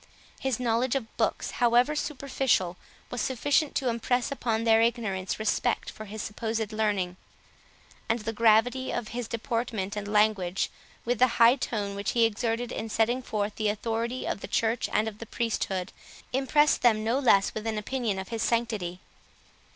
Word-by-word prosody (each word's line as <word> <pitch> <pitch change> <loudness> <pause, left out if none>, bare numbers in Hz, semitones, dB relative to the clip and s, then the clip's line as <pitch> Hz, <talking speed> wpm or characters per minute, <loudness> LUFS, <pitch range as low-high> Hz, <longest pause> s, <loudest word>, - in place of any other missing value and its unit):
His 265 -3 -1
knowledge 240 +1 +1
of 240 -5 -4
books, - - -1
however 245 +5 +4
superficial, 270 - 0 0.4
was 245 - -2
sufficient 285 +4 +1
to 265 - 0
impress 245 +2 0
upon 230 -5 -1
their 225 -1 +5
ignorance 220 -6 0
respect 215 -1 0
for 215 - -9
his 215 +1 -6
supposed 220 0 -3
learning; 200 -5 0 0.9
and 225 - +3
the 225 0 -4
gravity 230 +4 +3
of 230 -3 -3
his 240 -1 -4
deportment 230 -3 -2
and 205 -1 -4
language, 205 -3 +1 0.3
with 245 -1 0
the 250 -2 +3
high 235 +2 +7
tone 210 -6 -3
which 200 +1 -2
he 235 -1 +4
exerted 230 +2 -1
in 225 - -4
setting 235 +4 +1
forth 210 -4 -3
the 215 -1 +1
authority 230 +4 -2
of - - -2
the - - -6
church 225 +1 0
and 215 +1 +1
of 215 -1 -6
the 230 - -8
priesthood, 195 -6 -2 0.4
impressed 295 +3 +3
them 220 -3 +4
no 230 +4 +1
less 200 -7 +4
with 220 +1 -4
an 220 -1 -1
opinion 220 -1 -2
of 190 0 -5
his 225 -1 -3
sanctity. 215 -7 -1
225 Hz, 165 wpm, -28 LUFS, 210-245 Hz, 0.9 s, high